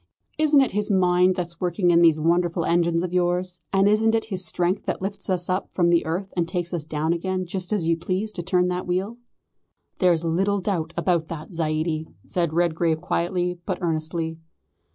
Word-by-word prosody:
Isn't 300 -2 +5
it 265 - +1
his 210 +2 -1
mind 180 -1 +3
that's 175 -2 -5
working 180 0 +2
in 170 0 +5
these 165 -2 +5
wonderful 170 +1 +1
engines 170 0 +2
of 180 -1 -4
yours, 180 0 0
and 195 0 +3
isn't 220 +2 +3
it 225 - 0
his 185 0 0
strength 180 +3 -1
that - - -1
lifts 195 +1 -5
us 180 -2 0
up 185 +1 -2
from 175 -2 +2
the 170 -2 +2
earth 185 +4 -3
and 170 -2 0
takes 175 -1 -3
us 170 -3 -2
down 155 +1 -1
again 185 +2 -2
just 180 +1 -4
as 195 -6 0
you 165 - +3
please 185 +5 -2
to 185 - -5
turn 180 0 +1
that 180 0 -3
wheel?" 190 +6 -2 0.8
"There's 170 -3 +3
little 195 +5 +1
doubt 175 -4 -2
about 170 -2 +1
that, 165 +2 -8
Zaidie," 155 0 -1 0.2
said 170 -3 -1
Redgrave 165 -1 +1
quietly, 180 +1 -1
but 185 -1 -2
earnestly. 160 -1 -2
175 Hz, 195 wpm, -24 LUFS, 170-185 Hz, 0.8 s, Isn't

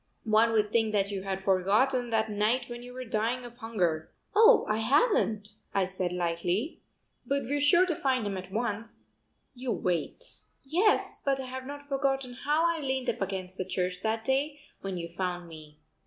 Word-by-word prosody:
One 220 +1 +4
would 210 -1 +2
think 220 -2 +2
that 200 -1 +1
you 195 -1 -3
had 190 0 -4
forgotten 215 +7 +2
that 220 -1 +1
night 220 +4 +1
when 240 0 -7
you 245 0 -10
were 255 0 -7
dying 230 +3 -1
of 240 0 -11
hunger." 180 -10 -1 0.3
"Oh, 450 +3 +7
I 215 - +1
haven't," 230 - +2 0.3
I 195 -1 +3
said 185 -1 -1
lightly, 180 - -1 0.4
"but 280 0 -1
we're 285 +4 -1
sure 345 +5 +6
to 345 -3 -1
find 260 -5 0
him 200 -1 -2
at 185 0 -7
once. 220 0 -4 0.4
You 250 -1 -4
wait." 180 - -2 0.2
"Yes, 355 +10 +2
but 275 -1 +1
I 265 - -4
have 260 0 -6
not 285 0 -8
forgotten 270 -2 0
how 300 +6 +1
I 335 -1 +1
leaned 265 -3 0
up - - -11
against 190 -1 -3
the - - +1
church 180 -1 -2
that 220 +1 -1
day 285 +2 +1 0.2
when 195 -2 -4
you 170 -1 -4
found 175 0 -3
me. 155 -2 -12
225 Hz, 185 wpm, -29 LUFS, 190-270 Hz, 0.4 s, Oh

